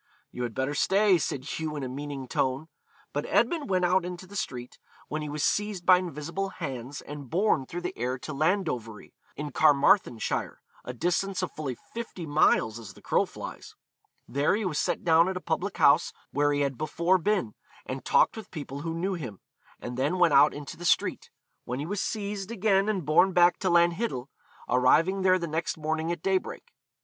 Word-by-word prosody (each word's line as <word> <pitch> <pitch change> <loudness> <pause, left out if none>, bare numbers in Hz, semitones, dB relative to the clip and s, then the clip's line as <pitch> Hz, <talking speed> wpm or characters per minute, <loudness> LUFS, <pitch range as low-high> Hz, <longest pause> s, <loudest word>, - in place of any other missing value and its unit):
'You 125 - -6
had 120 -2 -3
better 135 +2 -1
stay,' 195 +4 +3
said 135 -3 -3
Hugh 155 +1 -4
in 145 - -4
a - - -2
meaning 140 0 -6
tone. 135 +5 -1 0.4
But 145 +1 -2
Edmund 290 - +1
went 185 -2 +2
out 180 +1 +3
into 180 +1 -6
the 200 +2 -13
street, 125 -9 -5 0.3
when 155 +1 -3
he 150 - -4
was 150 0 -3
seized 205 -4 0
by 185 -1 +7
invisible 175 +3 -4
hands 135 -4 -6
and 145 -3 -9
borne 180 - +1
through 175 - -5
the 180 +2 -4
air 125 +2 -2
to 155 +4 -7
Landovery, 140 - -1 0.2
in 150 0 -5
Carmarthenshire, 145 - +2 0.2
a - - -5
distance 180 +7 -1
of 180 - -2
fully 140 -5 -4 0.2
fifty 225 -7 -6
miles 145 -7 +2
as 110 -4 -10
the - - -16
crow - - +2
flies. - - -9 0.5
There 140 - +1
he 215 0 -2
was 155 -5 -1
set - - -1
down 165 +1 +5
at 190 - -3
a - - -3
public 180 +3 -2
house 140 - +4 0.2
where 145 0 +2
he 145 0 0
had 140 -3 -1
before 170 +4 +1
been, 190 - 0 0.3
and - - -5
talked - - +3
with 220 -3 -9
people 140 -4 -7
who 165 +2 -4
knew 185 +4 -1
him. 125 - -6 0.4
He - - -4
then 135 +8 -1
went 175 -4 +4
out 140 +2 +7
into 145 -1 -8
the 175 - -9
street, - - +1 0.3
when 125 - -4
he 145 - -3
was 200 +3 -2
seized 200 -2 -3
again 205 -2 +2
and 190 -7 -1
borne 165 +6 +4
back 175 0 +5
to 190 - -1
Lanhiddel, 170 - +1 0.4
arriving 160 +10 +3
there 185 0 +4
the 170 - -3
next 160 +1 -2
morning 160 +1 -2
at 170 -2 -5
daybreak. 195 - -2
160 Hz, 195 wpm, -27 LUFS, 140-185 Hz, 0.5 s, by